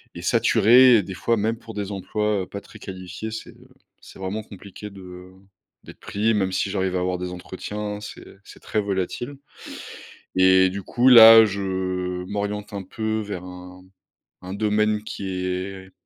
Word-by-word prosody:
est - - -7
est - - -8
saturé 115 +3 +5
et 105 - +1
des 95 +1 -7
fois, 115 +4 0
même 110 +2 -1
pour 115 -1 -11
des 100 -1 -4
emplois, 105 +1 -1
heu, - - -10
pas 100 - -7
très - - -15
qualifiés, 95 +3 -7
c'est, 110 - -7
heu, - - -20 0.3
c'est - - -15
vraiment 95 +3 -4
compliqué 100 +1 -11
de, 100 - -12
heu, 90 0 -12 0.5
d'être - - -14
pris. 110 +3 0
Même 95 -3 0
si 95 +1 -1
j'arrive 95 -2 -1
à - - 0
avoir 90 0 -1
des 90 0 -4
entretiens, 105 +3 -6
c'est 105 - -10 0.2
c'est - - -15
très 110 - -1
volatile 100 +7 -3 1.0
et 95 0 +5
du 100 +1 -6
coup, 125 +6 +1
là, 115 -2 +10
je 100 -1 -3 0.7
m'oriente 105 0 -4
un 100 - -5
peu 110 +3 -3
vers 100 -4 -6
un 90 0 -11 0.6
un 95 - -7
domaine 105 0 0
qui 100 -2 -6 0.2
est 95 +1 -5
100 Hz, 180 wpm, -23 LUFS, 95-110 Hz, 1.0 s, là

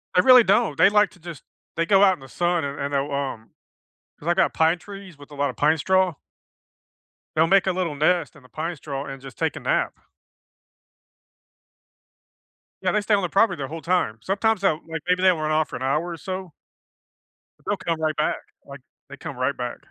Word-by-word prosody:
They 180 - +6
really 255 +3 +8
don't, 200 -6 +2
they 195 - +6
like 210 0 +3
to - - -20
just 170 -4 -10 0.3
they 165 - 0
go 195 +3 +5
out 190 - +6
in 180 - -9
the 135 0 -13
sun 175 +3 0
and 140 0 -5
and 140 +1 -3
they'll, 140 +1 -1
um 135 -5 -4 0.7
'cause 160 - -7
I 175 - +3
got - - +2
pine 165 +2 +3
trees 195 -3 -11
with 145 +1 -15
a - - -11
lot 140 -1 0
of 125 - -11
pine 155 +2 +2
straw 185 +1 +2 1.2
They'll 160 +1 +4
make 195 +2 +4
a - - +3
little 180 -5 -2
nest 155 +1 +1
in 140 - -17
the 125 - -19
pine 165 +7 -4
straw 140 -2 -6
and 135 -1 -8
just 135 -5 -11
take - - -1
a - - -6
nap. - - 0 2.9
Yeah, - - +1
they 210 - +1
stay 205 +1 0
on 200 - +3
the 180 - -2
property 195 -1 +2
their 135 -2 -4
whole 160 +2 -7
time. 170 -12 0
Sometimes, 200 - 0
they'll, 160 -6 +2
like 160 -1 -4
maybe 180 +1 +1
run 160 -5 +3
off 155 0 +1
for - - -7
an - - -6
hour 150 +6 0
or 170 - -6
so. 185 +2 -6 1.1
They'll - - -1
come 165 -2 -3
right 155 -1 0
back, 150 - 0 0.3
like, 140 -1 -11 0.3
they 140 - -10
come 135 - -8
right 130 +2 0
back. 125 -1 -5
160 Hz, 215 wpm, -23 LUFS, 140-185 Hz, 2.9 s, really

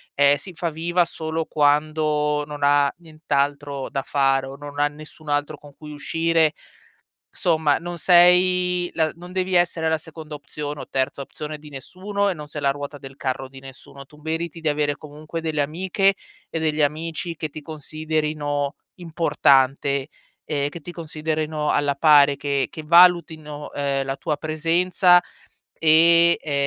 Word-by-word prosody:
ehm, 140 0 +5
si 175 +6 -9
fa 170 +1 -2
viva 170 +3 0
solo 160 0 -4
quando 150 0 +1
non 145 -1 -7
ha 145 0 +4
nient'altro 145 -4 -2
da 135 - -2
fare 135 -1 +1
o 135 - -8
non 145 0 -8
ha 145 - +4
nessun 155 +1 -12
altro 145 +1 -1
con 145 -1 -16
cui 150 -1 -10
uscire. 165 +1 +1 0.8
Somma, 160 -5 +1
non 175 0 -7
sei 180 +1 +4
la 160 -2 +1
non 175 +1 -12
devi 185 0 -1
essere 170 -2 +2
la 160 - +1
seconda 155 0 -10
opzione 145 0 -6
o - - -8
terza 135 +1 -1
opzione 150 +2 -7
di 150 0 -13
nessuno 195 +9 -3
e - - -2
non 150 -2 -9
sei 150 0 -7
la 140 - +3
ruota 145 +1 -5
del 135 -1 -12
carro 135 -1 -3
di 135 0 -13
nessuno, 135 +1 -13
tu 150 - -19
meriti 165 +1 -4
di 160 - -1
avere 145 -1 0
comunque 155 +3 -8
delle 155 -2 -1
amiche 185 +6 +1 0.3
e - - -4
degli 155 -1 -1
amici 160 +3 -2
che 155 -1 -4
ti 155 - -8
considerino 150 -1 -3 0.2
importante, 140 -5 +2 0.4
ehm, 145 -2 -1
che 170 - -9
ti 170 - -9
considerino 155 -2 -3
alla 145 -1 +1
pari, 145 -1 +6
che 140 -2 -1
che 155 - -8
valutino, 160 -3 +3
ehm, 140 -1 -1
la 135 0 -3
tua 150 +2 -2
presenza, 170 +3 +3 0.6
e, 170 +2 +5
ehm, 150 - -5
155 Hz, 160 wpm, -22 LUFS, 145-165 Hz, 0.8 s, pari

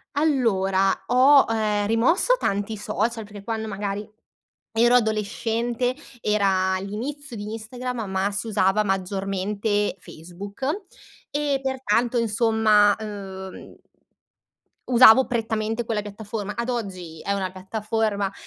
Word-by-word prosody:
Allora, 195 -10 +2
ho, 265 +3 +6
ehm, 215 -2 0
rimosso 265 - +3
tanti 205 +2 -1
social, 215 +2 -2
perché 205 -1 -11
quando 220 0 -3
magari 205 0 -4 0.6
ero 235 +2 +4
adolescente, 230 +2 0 0.3
era 190 -3 +2
l'inizio 245 +8 -6
di 210 0 -6
Instagram, 240 +1 -5
ma 190 +2 0
si 205 +3 -3
usava 205 -1 +2
maggiormente 195 +2 -1
Facebook, 190 +9 -9 0.7
e 290 -1 0
pertanto 255 -2 0
insomma, 220 -2 +3
uhm, 195 -3 -8 1.1
usavo 250 +1 +8
prettamente 225 -1 -1
quella 220 -2 -1
piattaforma, 210 0 -6
ad 235 +1 -3
oggi 185 -9 -5
è 200 - -1
una 190 -2 -2
piattaforma, 205 +1 -2
215 Hz, 105 wpm, -24 LUFS, 200-235 Hz, 1.1 s, usavo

